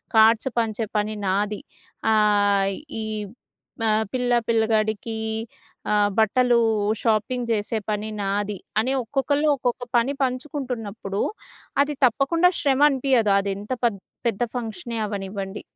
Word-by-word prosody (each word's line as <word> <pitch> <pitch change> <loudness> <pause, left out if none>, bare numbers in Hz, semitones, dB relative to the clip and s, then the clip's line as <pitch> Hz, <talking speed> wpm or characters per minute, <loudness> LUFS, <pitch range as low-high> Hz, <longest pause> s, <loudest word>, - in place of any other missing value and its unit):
Cards 225 +4 +5
పంచే 225 -1 -1
పని 210 +1 0
నాది. 205 +2 0 0.5
ఆహ్ 205 -2 +3 0.3
ఈ - - -3 0.8
మా 225 - +2 0.2
పిల్లా, 245 -1 +2
పిల్లగాడికీ 220 -1 +1 0.8
ఆహ్, 205 -1 +3
బట్టలూ 240 +2 +4 0.4
షాపింగ్ 235 +2 0
చేసే 220 +1 0
పని 215 +1 -2
నాది. 200 0 -1 0.2
అని 255 +4 +1
ఒక్కొక్కళ్ళు 285 +4 0
ఒక్కొక్క 250 -1 -2 0.2
పని 255 +4 +2
పంచుకుంటున్నప్పుడు 250 -7 -3 0.6
అది 295 0 -4
తప్పకుండా 330 +9 +3
శ్రమనిపియదు 270 -6 +3
అది 200 0 -2
ఎంత 210 +5 -9
పెద్ద్ 200 -5 -1 0.2
పెద్ద 230 +1 0
ఫంక్షనే 225 -1 -4
అవ్వనివ్వండి. 195 0 -5
220 Hz, 110 wpm, -24 LUFS, 205-250 Hz, 0.8 s, Cards